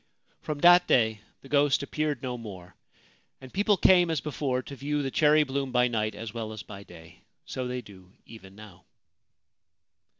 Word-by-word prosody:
From 150 - -4
that 175 +1 +7
day 110 -3 +2 0.2
the - - -14
ghost 140 0 +2
appeared 150 -2 -3
no 125 -1 -3
more, 95 -7 -10 0.6
and 130 -1 -13
people 205 +1 +2
came 180 -2 +5
as 160 -3 0
before 135 -3 -3
to 140 - -9
view 145 +2 -2
the 135 - -3
cherry 150 +1 +4
bloom 135 -1 -3
by 125 0 +3
night 110 -2 -2
as 110 0 -7
well 115 -2 -5
as 105 -4 -8
by 100 +1 -10
day; 85 -4 -15 0.2
so 130 -1 -5
they 125 0 -4
do 95 -5 -16
even 95 -4 -14
now. 105 -4 -14
125 Hz, 175 wpm, -27 LUFS, 110-145 Hz, 0.6 s, that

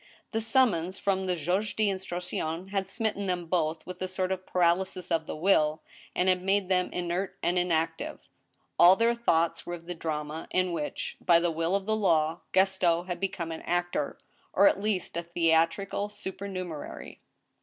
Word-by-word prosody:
The 225 -1 -1
summons 215 -7 +2
from 190 -1 0
i^aitjuge 180 +4 0
d* 215 -1 +2
instruction 180 -2 -3
had 195 -1 -2
smitten 215 -3 -2
them 180 -1 -1
both 160 -2 -1
with 180 0 -8
a 185 - -1
sort 185 0 -2
of 185 -1 -3
paralysis 180 +1 +1
of 160 -1 +1
the - - -4
will, 155 -2 +2 0.3
and 180 - +1
had 185 -1 +3
made 195 0 +1
them 180 -1 +2
inert 180 +2 -2
and 175 +2 +2
inactive; 165 -2 -1 0.5
all 175 +2 +9
their 230 +3 +3
thoughts 170 -8 +1
were 175 - -4
of 170 -1 -13
the 175 - -4
drama 155 -1 -4
in 185 -1 +1
which, 155 -3 -4
by 170 -2 +6
the 170 0 +1
will 165 +3 0
of 200 -1 -1
the 220 +1 +1
law, 165 -5 +2
Gaston 185 -3 +3
had 175 -1 -4
become 180 -4 -3
an 160 - -6
actor, 175 -4 -1 0.4
or 200 +2 +6
at 195 - +2
least 205 -5 -1
a - - 0
theatrical 170 +4 +1
supernumerary. 190 -5 -6
180 Hz, 175 wpm, -28 LUFS, 165-195 Hz, 0.5 s, all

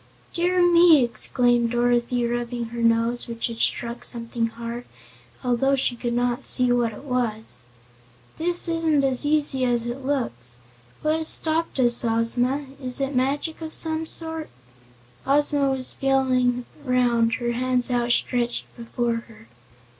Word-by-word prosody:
"Dear 355 +1 +1
me!" 340 -5 +6
exclaimed 240 +1 +1
Dorothy, 240 0 0
rubbing 240 0 -3
her 235 - -4
nose, 230 +1 +1
which 230 -1 -3
had 230 -1 -5
struck 235 0 -1
something 230 -1 -1
hard, 235 +1 -7 0.6
although 255 +2 +1
she 255 -2 -1
could 235 0 -3
not 245 +1 -1
see 250 -1 +4
what 240 -2 +1
it 215 - -12
was; 240 -5 -2 0.8
"this 350 +2 +1
isn't 325 -4 +1
as 270 +1 +4
easy 295 -3 +3
as 240 -2 +1
it 245 +3 -5
looks. 125 - -3 0.5
What 310 +1 +1
has 320 -1 +1
stopped 320 -2 +1
us, 240 -1 +4
Ozma? 245 +4 +1 0.2
Is 255 0 -1
it 275 0 -2
magic 285 +6 -1
of 315 -1 -4
some 320 0 -2
sort?" 320 -1 -4 0.8
Ozma 285 0 +2
was 265 -1 -3
feeling 255 -2 +1 0.2
around, 240 -3 +1
her 240 -1 -2
bands 250 +1 0
outstretched 240 0 +1
before 235 0 -2
her. 215 - -17
245 Hz, 140 wpm, -23 LUFS, 235-280 Hz, 0.8 s, me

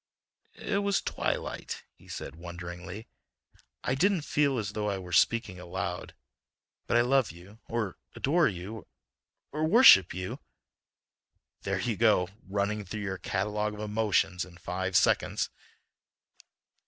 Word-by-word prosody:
"It 200 - -1
was 200 -1 +2
the - - -4
twilight," - - -3
he - - -21
said - - -6
wonderingly. 90 +4 -8 0.8
"I 125 - 0
didn't 180 +4 +2
feel 145 -3 +2
as 105 -2 -2
though 105 -1 -2
I 100 - -1
were 90 -2 -8
speaking 100 0 +2
aloud. 90 0 -4 0.7
But 120 - +3
I - - +6
love 130 -2 +3
you—or 100 +4 -5 0.2
adore 165 +4 +3
you—or 110 - -8
worship 155 - +8
you—" 90 +1 -5 1.2
"There 100 -1 -1
you 110 +2 -1
go—running 100 0 +1
through 105 +3 -5
your 95 -2 -3
catalogue 105 +3 -1
of - - -10
emotions 105 -4 +1
in 90 -2 -12
five 95 +2 -3
seconds." - - +2
105 Hz, 125 wpm, -29 LUFS, 90-115 Hz, 1.2 s, worship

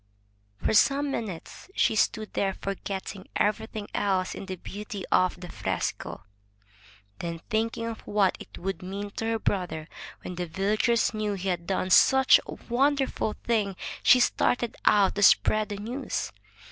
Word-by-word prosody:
For - - 0
some 280 +6 +4
minutes 210 - -6
she - - +3
stood 215 0 0
there 195 -1 0
forgetting 195 0 -5
everything 215 0 -1
else 190 -2 0
in 195 - -8
the 190 - -4
beauty 200 +1 -7
of 185 -1 +3
the 180 - -8
fresco. 100 - -3 1.0
Then, 170 -1 -4
thinking 225 +1 0
of 230 -1 -5
what 205 -2 +2
it - - -11
would 195 +2 -4
mean 200 +2 -5
to 225 - -2
her 225 0 +1
brother 180 -7 -2 0.4
when 180 - -5
the 180 0 -4
villagers 215 +7 +1
knew 215 -1 -1
he 190 0 -3
had 170 -2 -2
done 190 -1 -1
such 265 +7 +7
a - - -5
wonderful 270 -3 +1
thing, 210 -5 0 0.3
she 250 - +7
started 240 -1 +1
out 200 -2 +5
to 205 - -3
spread 215 +2 +4
the 205 - -4
news. 235 +7 -4
205 Hz, 155 wpm, -27 LUFS, 190-225 Hz, 1.0 s, such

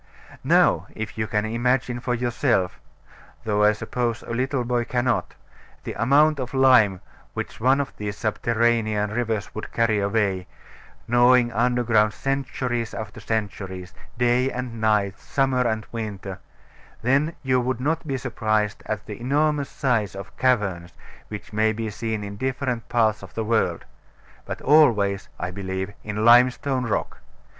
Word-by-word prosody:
Now - - +3
if 110 0 -5
you 110 0 -2
can 105 0 0
imagine 120 +2 0
for 125 0 -1
yourself 120 -5 0 0.6
(though 105 -1 +1
I 105 - +6
suppose 120 +2 -3
a - - -8
little 130 +2 0
boy 120 0 0
cannot) 120 0 -1 0.5
the - - -5
amount 140 +6 +3
of 130 +1 -4
lime 125 -8 +5 0.3
which - - -5
one 130 +4 +3
of 140 - -3
these 105 -1 -4
subterranean 110 -2 +1
rivers 110 -2 -2
would 110 - -6
carry 115 -2 +2
away, 100 -2 0 0.6
gnawing 120 0 +5
underground 120 -3 +2
centuries 125 -4 -2
after 110 -1 -6
centuries, 100 -4 -4 0.2
day 125 +2 +2
and 120 -2 -5
night, 105 -3 +1
summer 130 -2 +1
and 110 -1 -2
winter, 100 -4 -5 0.6
then 140 +6 +2
you 130 -1 +2
will 125 0 -2
not 160 +4 -1
be 135 -2 -1
surprised 110 -4 -1
at 110 -1 -3
the 105 +1 -8
enormous 145 +2 +1
size 110 -8 0
of 100 +2 -9
caverns 100 -9 0 0.3
which 105 0 -8
may 110 +1 +3
be 110 0 -4
seen 110 0 -3
in 100 0 -7
different 130 -1 -2
parts 110 -3 +2
of - - -12
the 115 - -1
world 105 -6 0 0.6
but - - -6
always, 110 -10 +4
I 90 +1 -3
believe, 95 +1 -4
in 105 +1 -2
limestone 125 +2 +4
rock. 110 - -2
115 Hz, 145 wpm, -24 LUFS, 105-125 Hz, 0.6 s, I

